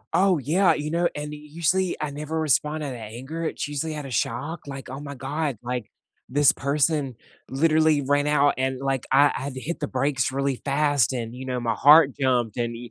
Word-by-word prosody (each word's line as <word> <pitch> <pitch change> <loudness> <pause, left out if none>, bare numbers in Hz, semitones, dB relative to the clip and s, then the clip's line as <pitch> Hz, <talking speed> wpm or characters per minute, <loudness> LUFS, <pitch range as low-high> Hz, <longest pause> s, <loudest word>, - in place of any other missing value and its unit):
Oh 190 -2 +4
yeah, 170 +8 +2
you 150 +1 -4
know, 170 +1 +1
and 150 0 -5
usually 165 +5 -1
I 150 -1 -3
never 150 +2 -4
responded 150 0 0
to - - -5
that 120 - -8
anger, 155 +8 -5
it's 155 - -3
usually 150 +2 -3
outta 140 -3 -6
shock, 145 +7 -2
like, 135 -1 -7
"Oh 130 - -6
my 140 -1 -7
God, 145 -1 -3
like 125 -2 -4 0.4
this 145 +1 +5
person 140 -2 0 0.3
literally 155 +1 +3
ran 145 +2 +1
out 145 -1 +3
and 130 0 -1
like 135 -2 -2
I 140 +2 +5
I - - -4
had 135 0 -5
to 130 - -5
hit 170 +6 -5
the 150 - -2
brakes 130 0 0
really 135 -1 -1
fast 145 -3 +2
and, 120 -1 -4
you 130 +1 -7
know, 125 -1 -2
my 115 -1 -1
heart 145 +4 +7
jumped 125 -5 +1
and" 120 -1 -2
145 Hz, 205 wpm, -24 LUFS, 130-155 Hz, 0.4 s, heart